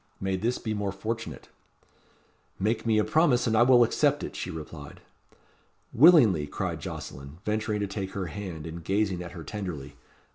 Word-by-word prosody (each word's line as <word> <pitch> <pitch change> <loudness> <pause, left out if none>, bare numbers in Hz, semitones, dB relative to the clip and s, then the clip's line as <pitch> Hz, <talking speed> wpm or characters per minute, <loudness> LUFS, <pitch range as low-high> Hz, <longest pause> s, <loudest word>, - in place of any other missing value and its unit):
May 95 0 -1
this 115 +6 -1
be 110 - -3
more 105 -2 -2
fortunate." 110 +3 -5 1.1
"Make 110 +3 -1
me 110 -1 +3
a 105 - +4
promise, 150 -5 +3
and 115 -2 +1
I 110 - +5
will 120 0 +7
accept 115 - +1
it," - - -6
she - - -4
replied. 75 -2 -8 0.9
"Willingly,", 115 - +6
cried - - -3
Jocelyn, 70 +3 -7
venturing 105 0 -1
to 100 - -1
take 95 -1 -5
her 100 -2 -3
hand, 85 -2 -6
and 80 +1 -7
gazing 95 0 0
at 85 - -8
her 85 - -8
tenderly. 80 -9 -6
100 Hz, 170 wpm, -27 LUFS, 85-110 Hz, 1.1 s, will